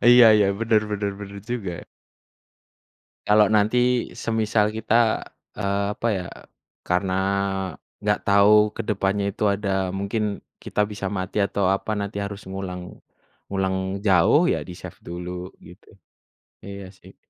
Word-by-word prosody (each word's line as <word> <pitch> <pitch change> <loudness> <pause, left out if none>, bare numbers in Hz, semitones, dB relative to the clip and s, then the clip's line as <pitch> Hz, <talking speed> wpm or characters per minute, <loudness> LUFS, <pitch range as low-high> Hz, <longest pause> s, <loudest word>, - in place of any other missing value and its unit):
Iya 120 -1 +9
iya, 105 -2 +4
bener 110 -1 +3
bener 100 -1 -1
bener 100 0 -8
juga. 110 -7 -2 1.6
Kalau 105 0 +5
nanti, 120 +4 +2
semisal 110 -1 +1
kita 110 +1 +2 0.4
eee, 100 0 0
apa 115 - 0
ya, 90 -2 -4 0.6
karena 90 +1 0 0.9
enggak 105 0 0
tahu 105 +1 +5
ke - - -6
depannya 100 0 0
itu 105 - +1
ada 95 -2 -1
mungkin 100 +2 -2 0.2
kita 105 0 0
bisa 100 -2 -5
mati 95 +1 -1
atau 100 -1 0
apa 100 +3 0
nanti 100 0 -3
harus 100 -1 -6
ngulang 90 -2 -6 0.6
ngulang 95 0 -1
jauh 100 - +4
ya - - +1
di-save 90 -1 -10
dulu 90 +1 -6
gitu. - - -16 0.7
Iya 100 -1 -9
sih. 95 - -18
100 Hz, 130 wpm, -24 LUFS, 95-105 Hz, 1.6 s, Iya